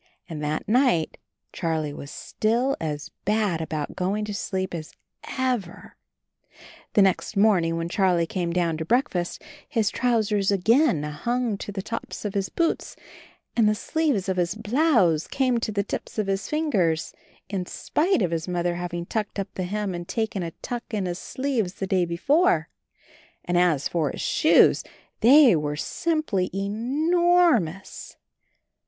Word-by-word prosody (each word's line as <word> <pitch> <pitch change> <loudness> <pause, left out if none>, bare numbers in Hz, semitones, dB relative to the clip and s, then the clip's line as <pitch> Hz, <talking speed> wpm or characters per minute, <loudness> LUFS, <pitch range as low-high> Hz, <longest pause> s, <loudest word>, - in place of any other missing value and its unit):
And 155 -3 -6
that 150 +1 -2
night 235 - +2 0.3
Charlie 160 -3 -2
was 140 - -8
still 240 - 0
as 150 -2 -4
bad 205 -5 +1
about 155 -2 -4
going 200 +3 -1
to 210 - -5
sleep 190 -2 -3
as 160 -2 -6 0.4
ever! 245 -9 -2 1.0
The 205 - +6
next 195 +2 0
morning 180 -6 +3
when 165 0 -2
Charlie 180 -2 +2
came 175 0 -2
down 170 -2 0
to 160 - -3
breakfast 225 - 0 0.3
his 220 -3 +1
trousers 215 -5 +1
again 205 - +3
hung 230 +10 -1
to - - -6
the 195 -1 -5
tops 230 0 -6
of 205 - -2
his 195 -2 -1
boots, 335 -1 -1 0.6
and 225 -3 +4
the 215 - +2
sleeves 285 -6 0
of 190 -1 -1
his 175 +2 0
blouse 220 - +2
came 255 -3 +1
to 225 - -2
the 200 -1 0
tips 205 - -6
of 215 - +1
his 195 0 -2
fingers, 195 - 0 0.3
in 190 -3 -3
spite 335 - 0
of 175 - 0
his 165 0 -2
Mother 175 -1 -1
having 175 -1 -4
turned 210 +2 -3
up 195 -1 -4
the 185 - -3
hem 205 +1 -2
and 175 0 -6
taken 220 -3 -2
a 170 - -3
tuck 240 -1 -5
in 200 -3 -1
his 175 0 -3
sleeves 245 -9 -2
the 195 - -3
day 185 -2 +1
before 290 - +2 0.4
— - - -28
and 175 - -1
as 175 -5 +3
for 165 -4 0
his - - -6
shoes - - +4 0.4
they 260 - +7
were 150 -1 -1
simply 235 - -1
ENORMOUS! 250 - +1
195 Hz, 160 wpm, -25 LUFS, 175-235 Hz, 1.0 s, they